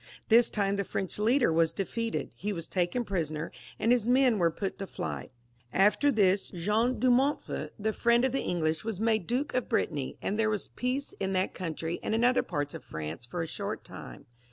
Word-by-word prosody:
This 230 Hz, +1 st, +6 dB
time 200 Hz, -1 st, 0 dB
the 200 Hz, -, 0 dB
French 190 Hz, +1 st, -3 dB
leader 235 Hz, -, +3 dB
was 165 Hz, 0 st, +3 dB
defeated; 225 Hz, +5 st, -3 dB
he 210 Hz, -, -3 dB
was 165 Hz, -5 st, -4 dB
taken 185 Hz, +7 st, 0 dB
prisoner, 160 Hz, -5 st, -2 dB, 0.3 s
and 230 Hz, -, +2 dB
his 240 Hz, -3 st, +3 dB
men 250 Hz, -3 st, +4 dB
were 170 Hz, -1 st, +4 dB
put 195 Hz, +5 st, -4 dB
to 195 Hz, -, -4 dB
flight. 180 Hz, -, -5 dB, 0.4 s
After 210 Hz, +9 st, +4 dB
this, 200 Hz, -4 st, +3 dB
John 210 Hz, +8 st, +1 dB
de 255 Hz, -1 st, +4 dB
Montfort, 270 Hz, +4 st, 0 dB
the 215 Hz, +1 st, -1 dB
Mend 235 Hz, +1 st, +5 dB
of 265 Hz, -, +1 dB
the 270 Hz, -, 0 dB
English, 160 Hz, -2 st, 0 dB
was 220 Hz, -4 st, -3 dB
made 220 Hz, -4 st, +1 dB
Duke 265 Hz, +5 st, -1 dB
of 250 Hz, -2 st, -1 dB
Brittany, 145 Hz, -5 st, -1 dB
and 210 Hz, +3 st, -2 dB
there 220 Hz, -1 st, +3 dB
was 210 Hz, -3 st, -2 dB
peace 255 Hz, +3 st, -2 dB
in 195 Hz, 0 st, -1 dB
that 185 Hz, 0 st, 0 dB
country 165 Hz, -1 st, -4 dB
and 220 Hz, -, -1 dB
in 230 Hz, -, +1 dB
other 250 Hz, +1 st, +4 dB
parts 145 Hz, -4 st, -3 dB
of -, -, -8 dB
France 80 Hz, +8 st, -6 dB
for 165 Hz, +6 st, -3 dB
a -, -, -4 dB
short -, -, -4 dB
time. -, -, -10 dB
205 Hz, 205 wpm, -29 LUFS, 175-235 Hz, 0.4 s, This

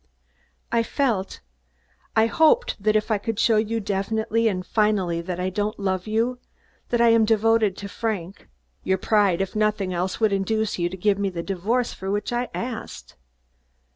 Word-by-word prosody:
"I 235 Hz, -, +3 dB
felt 230 Hz, -, -1 dB, 0.7 s
I 220 Hz, 0 st, +5 dB
hoped 320 Hz, -, +2 dB
that 215 Hz, +1 st, +2 dB
if 215 Hz, +1 st, +1 dB
I 210 Hz, -, +2 dB
could 225 Hz, +1 st, -3 dB
show 225 Hz, 0 st, +3 dB
you 225 Hz, +1 st, 0 dB
definitely 220 Hz, +3 st, 0 dB
and 185 Hz, -4 st, -1 dB
finally 200 Hz, -6 st, +1 dB
that 180 Hz, +1 st, -5 dB
I 185 Hz, +1 st, -1 dB
don't 210 Hz, +2 st, -2 dB
love 190 Hz, -1 st, -2 dB
you, 230 Hz, +3 st, 0 dB, 0.5 s
that 240 Hz, -, +1 dB
I 235 Hz, 0 st, +5 dB
am 230 Hz, -1 st, +5 dB
devoted 220 Hz, -2 st, +2 dB
to 200 Hz, -, -6 dB
Frank, 200 Hz, -4 st, -4 dB, 0.3 s
your 190 Hz, 0 st, +1 dB
pride, 195 Hz, -2 st, +2 dB
if 195 Hz, +1 st, -3 dB
nothing 210 Hz, -3 st, 0 dB
else, 180 Hz, +1 st, -2 dB
would 220 Hz, -3 st, +2 dB
induce 210 Hz, +1 st, -1 dB
you 175 Hz, 0 st, +1 dB
to 190 Hz, -, -7 dB
give 200 Hz, +2 st, +1 dB
me 200 Hz, -1 st, 0 dB
the 170 Hz, -2 st, -5 dB
divorce 215 Hz, +7 st, -1 dB
for 190 Hz, -, -6 dB
which 205 Hz, +4 st, -2 dB
I 245 Hz, +1 st, -1 dB
asked. 240 Hz, -2 st, -6 dB
210 Hz, 175 wpm, -24 LUFS, 190-225 Hz, 0.7 s, I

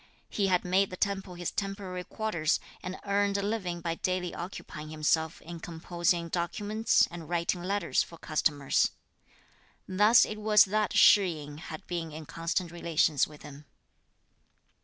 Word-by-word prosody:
He 200 Hz, -2 st, 0 dB
had 180 Hz, -2 st, +2 dB
made 190 Hz, +2 st, +2 dB
the 185 Hz, -, -7 dB
temple 195 Hz, -2 st, -2 dB
his 175 Hz, -1 st, -3 dB
temporary 195 Hz, -2 st, -4 dB
quarters, 175 Hz, -6 st, -1 dB, 0.2 s
and 185 Hz, +1 st, -6 dB
earned 200 Hz, 0 st, +1 dB
a 200 Hz, -, -2 dB
living 190 Hz, -5 st, -2 dB
by 165 Hz, -1 st, -1 dB
daily 180 Hz, +1 st, -2 dB
occupying 160 Hz, -3 st, -7 dB
himself 155 Hz, +1 st, 0 dB
in 170 Hz, 0 st, -8 dB
composing 170 Hz, +1 st, -1 dB
documents 205 Hz, +6 st, +1 dB
and 170 Hz, -2 st, -8 dB
writing 175 Hz, 0 st, 0 dB
letters 195 Hz, 0 st, 0 dB
for 170 Hz, -, -7 dB
customers. 150 Hz, -3 st, +1 dB, 1.0 s
Thus 210 Hz, +5 st, +6 dB
it 215 Hz, -, -6 dB
was 210 Hz, -1 st, +6 dB
that 210 Hz, +2 st, 0 dB
Shih 200 Hz, -2 st, +7 dB
yin 145 Hz, +1 st, -9 dB
had 155 Hz, -1 st, -8 dB
been 170 Hz, -2 st, -4 dB
in 155 Hz, +1 st, -8 dB
constant 165 Hz, +2 st, -2 dB
relations 165 Hz, -4 st, +1 dB
with 150 Hz, -1 st, -14 dB
him. 145 Hz, 0 st, -11 dB
175 Hz, 150 wpm, -29 LUFS, 165-200 Hz, 1.0 s, Shih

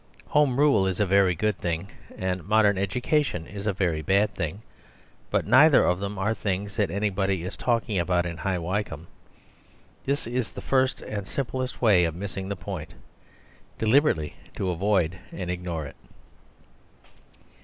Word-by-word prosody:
Home 145 Hz, -3 st, +3 dB
Rule 140 Hz, -10 st, +4 dB
is 95 Hz, 0 st, -2 dB
a 105 Hz, -, +3 dB
very 95 Hz, -1 st, +4 dB
good 105 Hz, +2 st, 0 dB
thing, 85 Hz, +2 st, -3 dB, 0.3 s
and 95 Hz, -1 st, -2 dB
modern 105 Hz, +1 st, +4 dB
education 100 Hz, -, 0 dB
is 100 Hz, +2 st, -7 dB
a -, -, +3 dB
very 90 Hz, -5 st, 0 dB
bad 100 Hz, +6 st, +2 dB
thing; 90 Hz, +5 st, -4 dB, 0.7 s
but -, -, 0 dB
neither 150 Hz, +2 st, +6 dB
of 90 Hz, 0 st, +1 dB
them 100 Hz, +1 st, -4 dB
are 100 Hz, +3 st, +1 dB
things 100 Hz, -1 st, -3 dB
that -, -, +2 dB
anybody 95 Hz, -1 st, 0 dB
is 90 Hz, -, -5 dB
talking 115 Hz, -5 st, 0 dB
about 85 Hz, 0 st, +1 dB
in 85 Hz, -1 st, -4 dB
High 95 Hz, +2 st, -1 dB
Wycombe. 90 Hz, -2 st, -3 dB, 1.0 s
This 140 Hz, +2 st, -1 dB
is 120 Hz, 0 st, -3 dB
the -, -, -7 dB
first 130 Hz, -1 st, +1 dB
and 100 Hz, -2 st, -5 dB
simplest 130 Hz, 0 st, -3 dB
way 95 Hz, -6 st, +5 dB
of 80 Hz, -1 st, -2 dB
missing 95 Hz, +1 st, -5 dB
the 100 Hz, -, -2 dB
point: 90 Hz, -3 st, -7 dB, 0.8 s
deliberately 110 Hz, -, +2 dB, 0.2 s
to 95 Hz, -, -1 dB
avoid 95 Hz, -1 st, +1 dB
and 90 Hz, -2 st, -4 dB
ignore 90 Hz, -3 st, -4 dB
it. 65 Hz, -, -10 dB
100 Hz, 155 wpm, -26 LUFS, 90-110 Hz, 1.0 s, neither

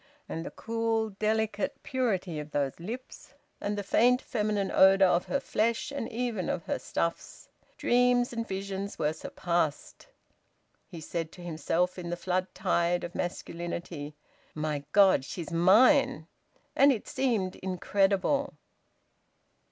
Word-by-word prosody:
And 165 Hz, -, -4 dB
the -, -, -5 dB
cool, 225 Hz, -1 st, -1 dB
delicate 215 Hz, 0 st, -1 dB
purity 210 Hz, -, -1 dB
of 150 Hz, 0 st, -7 dB
those 140 Hz, -1 st, -2 dB
lips! 235 Hz, +9 st, -8 dB, 0.3 s
And 205 Hz, 0 st, -2 dB
the 205 Hz, -, -2 dB
faint 245 Hz, +5 st, +4 dB
feminine 210 Hz, -5 st, -1 dB
odour 190 Hz, 0 st, +6 dB
of 175 Hz, 0 st, +2 dB
her 280 Hz, -, 0 dB
flesh 230 Hz, +6 st, -1 dB
and 275 Hz, -5 st, -4 dB
even 230 Hz, -5 st, -2 dB
of 170 Hz, -, -2 dB
her -, -, -2 dB
stuffs! 170 Hz, 0 st, -4 dB, 0.3 s
Dreams 245 Hz, 0 st, +3 dB
and 230 Hz, -1 st, -3 dB
visions 195 Hz, +1 st, -4 dB
were 155 Hz, -1 st, 0 dB
surpassed. 170 Hz, -, -2 dB, 0.8 s
He 170 Hz, -4 st, -9 dB
said 165 Hz, 0 st, -4 dB
to 180 Hz, -, -11 dB
himself, 175 Hz, +2 st, -1 dB
in 175 Hz, -1 st, -5 dB
the 175 Hz, -, -3 dB
flood 185 Hz, +1 st, -1 dB
tide 175 Hz, -2 st, +1 dB
of 175 Hz, -, -6 dB
masculinity 170 Hz, -3 st, -5 dB, 0.4 s
"My 150 Hz, -2 st, -2 dB
God! 195 Hz, -8 st, +5 dB
She's 170 Hz, +4 st, -6 dB
mine." 190 Hz, -, +5 dB, 0.5 s
And 280 Hz, +1 st, +6 dB
it 230 Hz, -6 st, -3 dB
seemed 225 Hz, -8 st, -1 dB
incredible. 195 Hz, +8 st, 0 dB
190 Hz, 135 wpm, -29 LUFS, 170-225 Hz, 0.8 s, odour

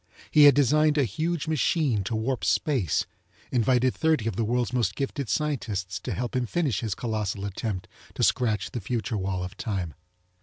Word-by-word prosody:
He 150 Hz, -1 st, +7 dB
had 140 Hz, -3 st, +8 dB
designed 150 Hz, +2 st, +3 dB
a 145 Hz, -, +4 dB
huge 155 Hz, -, -2 dB
machine 150 Hz, -, +1 dB
to 110 Hz, -, -2 dB
warp 120 Hz, +4 st, -1 dB
space, 125 Hz, -, +1 dB, 0.5 s
invited 125 Hz, +1 st, +2 dB
thirty 155 Hz, -8 st, +1 dB
of 115 Hz, -, -2 dB
the 115 Hz, -, 0 dB
worlds 120 Hz, +2 st, 0 dB
most 125 Hz, -3 st, +1 dB
gifted 140 Hz, -2 st, -3 dB
scientists 105 Hz, -, -2 dB
to -, -, -4 dB
help 125 Hz, +1 st, -3 dB
him 125 Hz, -2 st, 0 dB
finish 145 Hz, -, 0 dB
his 110 Hz, -5 st, -2 dB
colossal 105 Hz, -3 st, -3 dB
attempt 100 Hz, -1 st, -4 dB, 0.3 s
to -, -, -1 dB
scratch 110 Hz, -6 st, +1 dB
the 120 Hz, -, -4 dB
future 115 Hz, +3 st, -2 dB
wall 95 Hz, -2 st, -2 dB
of 90 Hz, -, -6 dB
time. 95 Hz, -8 st, -3 dB
120 Hz, 180 wpm, -26 LUFS, 105-140 Hz, 0.5 s, had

